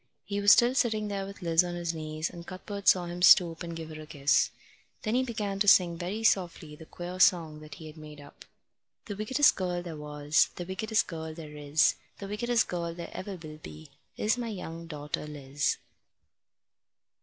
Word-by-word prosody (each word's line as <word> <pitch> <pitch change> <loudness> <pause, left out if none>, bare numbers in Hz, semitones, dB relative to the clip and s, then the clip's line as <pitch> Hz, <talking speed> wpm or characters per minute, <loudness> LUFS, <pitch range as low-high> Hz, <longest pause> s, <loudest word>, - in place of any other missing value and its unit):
He 205 +1 -2
was 205 0 +7
still 240 +1 +6
sitting 220 -5 +1
there 195 -1 -3
with 200 -1 -10
Liz 165 0 +4
on 175 0 -4
his 170 -1 -2
knees, 155 0 -3
and 170 -1 -10
Cuthbert 200 +2 -7
saw 180 -2 +5
him 175 +1 -6
stoop 170 -2 +6
and 170 -1 -5
give 160 -1 -7
her 155 0 -8
a 155 - -11
kiss. 145 -3 +2 0.5
Then 215 - -1
he 255 - +3
began 210 -6 -3
to 205 - +2
sing 180 -3 +6
very 185 +6 -4
softly 175 -7 +1
the 160 +1 -13
queer 180 +1 -7
song 165 -5 +3
that 155 0 -11
he 160 - -11
had 155 +1 -11
made 150 -1 -11
up: 145 0 -14 0.6
The 205 -5 -5
wickedest 260 +8 +3
girl 180 -2 -2
there 170 -2 -7
was, 150 0 +1
The 175 - -5
wickedest 210 +4 0
girl 160 -1 -6
there 155 -2 -9
is, 150 +1 +2 0.2
The 200 - -7
wickedest 230 +3 +1
girl 170 -1 -3
there 170 -1 -7
ever 195 +1 -6
will 155 -3 -10
be 80 - -11 0.3
Is 225 +4 +1
my 235 -1 -3
young 170 -5 -7
daughter 150 -1 -5
Liz. 145 -1 -2
175 Hz, 200 wpm, -29 LUFS, 155-200 Hz, 0.6 s, was